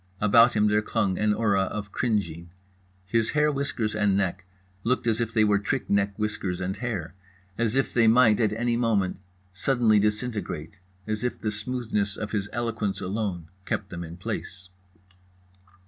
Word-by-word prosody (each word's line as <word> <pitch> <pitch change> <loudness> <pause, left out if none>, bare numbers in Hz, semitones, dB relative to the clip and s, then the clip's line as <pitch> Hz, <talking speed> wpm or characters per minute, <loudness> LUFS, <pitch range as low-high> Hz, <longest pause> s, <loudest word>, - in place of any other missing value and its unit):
About 115 +3 +5
him 105 0 +4
there 105 0 +3
clung 105 -4 0
an 105 0 +2
aura 105 -3 +2
of 105 +1 -5
cringing. 85 -9 -1 0.6
His 115 +3 +1
hair 150 0 +4
whiskers 135 -6 -2
and 105 -2 +2
neck 95 -1 -1 0.4
looked 125 +1 0
as 115 0 +1
if 115 -1 -1
they 110 -2 +3
were 105 -1 +3
trick 100 - -2
neck 100 0 +1
whiskers 105 -4 -2
and 95 +1 -2
hair, 110 -10 -4 0.4
as 115 +1 0
if 135 - +1
they 115 -2 +4
might 115 -1 +5
at 110 -3 +2
any 120 +2 0
moment 110 -6 +1 0.3
suddenly 110 +1 +3
disintegrate, 105 -5 -2 0.3
as 110 0 -3
if 125 - -2
the 105 - -2
smoothness 105 -2 -2
of 105 -1 -5
his 105 -2 -2
eloquence 115 -4 -2
alone 95 -4 -3
kept 100 +1 -3
them 85 -1 -5
in 85 +1 -9
place. 95 +1 -6
105 Hz, 165 wpm, -26 LUFS, 100-115 Hz, 0.6 s, About